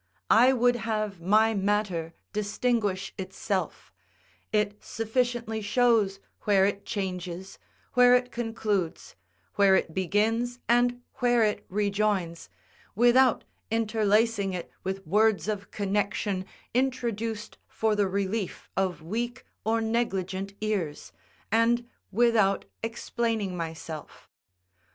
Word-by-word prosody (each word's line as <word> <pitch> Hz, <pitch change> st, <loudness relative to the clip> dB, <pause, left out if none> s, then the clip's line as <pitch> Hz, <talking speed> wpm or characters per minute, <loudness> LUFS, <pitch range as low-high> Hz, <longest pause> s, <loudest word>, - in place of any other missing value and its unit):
I 245 Hz, +4 st, +7 dB
would 245 Hz, -1 st, +3 dB
have 215 Hz, -5 st, -2 dB
my 215 Hz, +5 st, +4 dB
matter 195 Hz, -5 st, -1 dB, 0.2 s
distinguish 210 Hz, -2 st, -1 dB
itself; 190 Hz, -, -3 dB, 0.6 s
it 210 Hz, -1 st, 0 dB
sufficiently 230 Hz, -1 st, -1 dB
shows 215 Hz, -2 st, +2 dB, 0.2 s
where 195 Hz, -2 st, +3 dB
it 200 Hz, 0 st, -2 dB
changes, 185 Hz, -2 st, -4 dB, 0.3 s
where 250 Hz, 0 st, +7 dB
it 250 Hz, 0 st, 0 dB
concludes, 220 Hz, -7 st, -2 dB, 0.4 s
where 200 Hz, -1 st, +6 dB
it 165 Hz, -, 0 dB
begins, 220 Hz, +6 st, +1 dB
and 245 Hz, +1 st, +2 dB
where 245 Hz, -2 st, +3 dB
it 210 Hz, -1 st, 0 dB
rejoins, 200 Hz, -4 st, 0 dB, 0.5 s
without 240 Hz, +2 st, +5 dB, 0.3 s
interlacing 215 Hz, -2 st, +2 dB
it 180 Hz, -2 st, -5 dB
with 190 Hz, 0 st, -4 dB
words 210 Hz, +4 st, +3 dB
of 205 Hz, -2 st, -3 dB
connection 200 Hz, -1 st, -1 dB, 0.3 s
introduced 230 Hz, -4 st, -2 dB
for 220 Hz, -1 st, 0 dB
the 205 Hz, -1 st, +2 dB
relief 195 Hz, +1 st, -3 dB
of 185 Hz, -4 st, -1 dB
weak 240 Hz, +8 st, -3 dB, 0.2 s
or 225 Hz, +1 st, +1 dB
negligent 195 Hz, -4 st, -1 dB
ears, 195 Hz, -9 st, -2 dB, 0.4 s
and 235 Hz, +2 st, +3 dB, 0.2 s
without 215 Hz, -3 st, +3 dB, 0.2 s
explaining 225 Hz, -3 st, -2 dB
myself. 160 Hz, -2 st, -7 dB
210 Hz, 105 wpm, -27 LUFS, 195-230 Hz, 0.6 s, I